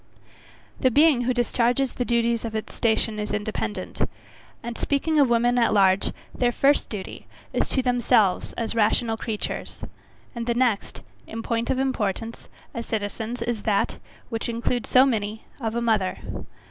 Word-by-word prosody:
The 260 - +4
being 280 -1 +4
who 255 - +2
discharges 245 +2 +1
the 245 - -2
duties 235 -1 +1
of 225 -1 -4
its 220 - -4
station, 220 -1 +1
is 210 - -3
independent; 210 0 -3 0.6
and, 235 0 -5
speaking 300 +4 +1
of 275 -3 +5
women 240 +1 +3
at 230 - +3
large, 195 -1 +4 0.2
their 245 -1 +1
first 280 +4 +2
duty 205 -4 -7 0.3
is - - 0
to 260 - +1
themselves 240 -6 +2
as 230 - -3
rational 225 +1 +2
creatures, 220 -1 -4 0.6
and 235 -1 -5
the 235 - +1
next, 240 -4 0 0.3
in 225 0 -6
point 230 0 -1
of - - +1
importance, 230 -4 -2 0.2
as 235 -1 -5
citizens, 220 +2 -3
is 235 -3 -2
that, 205 -3 +1 0.3
which 225 -1 -3
includes 235 +1 -1
so 255 +1 +7
many, 220 -4 -2
of 225 -3 -2
a 235 - 0
mother. 215 -5 +1
235 Hz, 160 wpm, -25 LUFS, 220-245 Hz, 0.6 s, so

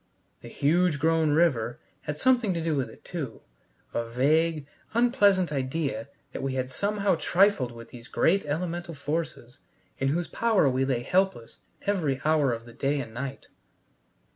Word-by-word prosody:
The - - -10
huge 170 +2 +2
grown 160 +1 +2
river 145 -7 +2 0.3
had 150 0 -3
something 240 -3 +3
to 165 - -2
do 160 -2 0
with 135 -3 -1
it - - -16
too 145 -10 -5 0.5
a 115 0 -2
vague, 155 +5 +2 0.3
unpleasant 205 - +4
idea 140 0 -2 0.2
that - - -5
we 135 -1 -2
had 130 0 -2
somehow 200 +5 +1
trifled 180 -9 +3
with 115 0 -11
these 120 -1 -11
great 195 +10 +2
elemental 170 +2 -3
forces 145 -4 -4 0.4
in 135 - +1
whose 170 +5 0
power 225 -9 +2
we 130 0 +1
lay 125 -3 -1
helpless 185 -7 0 0.2
every 160 -10 0
hour 155 -4 +3
of 115 0 -4
the 120 - -13
day 140 +4 0
and 115 -4 -6
night. 135 +3 -5
150 Hz, 160 wpm, -27 LUFS, 130-175 Hz, 0.5 s, unpleasant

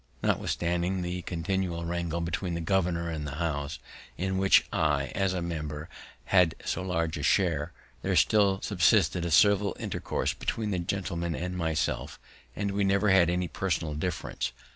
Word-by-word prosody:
Notwithstanding 90 +2 0
the 90 +1 -3
continual 85 0 -2
wrangle 85 0 -2
between 85 +1 -2
the - - -2
governor 85 -1 0
and 75 -2 -4
the 70 - -5
House, 75 -3 -2 0.4
in 95 +2 -1
which 95 0 +5
I, 75 -4 +1
as 95 -1 +1
a 90 -2 -2
member, 75 -2 -4 0.4
had 90 -2 +4
so - - -1
large 85 -3 -1
a - - -4
share, 80 -1 +2 0.3
there - - 0
still 100 -3 +4
subsisted 90 -2 +3
a - - -1
civil 100 +5 +4
intercourse - - -2
between 110 -2 -2
that 90 -2 -2
gentleman 85 -4 -2
and 90 +3 -4
myself, 80 -4 -2 0.4
and 100 -1 -1
we 100 +1 0
never 100 +1 +3
had 90 -3 +5
any 90 0 0
personal 80 -4 -2
difference. 85 +5 -3
85 Hz, 160 wpm, -28 LUFS, 80-95 Hz, 0.4 s, which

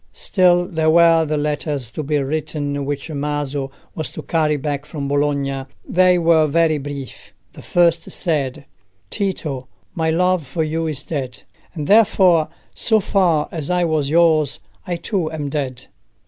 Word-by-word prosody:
Still 175 -2 +3
there 160 -4 0
were 165 0 +5
the 155 0 -1
letters 145 -4 -2
to 155 - -4
be 150 0 0
written 145 0 -2
which 145 +3 -4
Maso 145 -2 -3 0.2
was 155 - -3
to - - -7
carry 155 -2 +1
back 145 0 -3
from 140 -3 -5
Bologna. 140 -1 -1 0.2
They 185 0 +4
were 165 -2 +4
very 155 0 +2
brief. 140 -1 -8 0.2
The - - -11
first 170 -2 +2
said— 140 -6 -1 0.5
"Tito, 155 -10 -3 0.3
my 160 -1 0
love 180 -2 +1
for 160 +5 -1
you 160 +1 -2
is 145 -3 -3
dead; 130 -5 -5 0.3
and 150 -3 -4
therefore, 190 -5 +4 0.2
so 220 -2 +2
far 180 -6 +1
as 155 -4 -4
I 180 0 +2
was 155 -4 0
yours, 160 -3 +3 0.3
I 175 - -1
too 170 -2 -2
am 150 -3 -4
dead. 130 -4 -4
155 Hz, 155 wpm, -20 LUFS, 145-170 Hz, 0.5 s, were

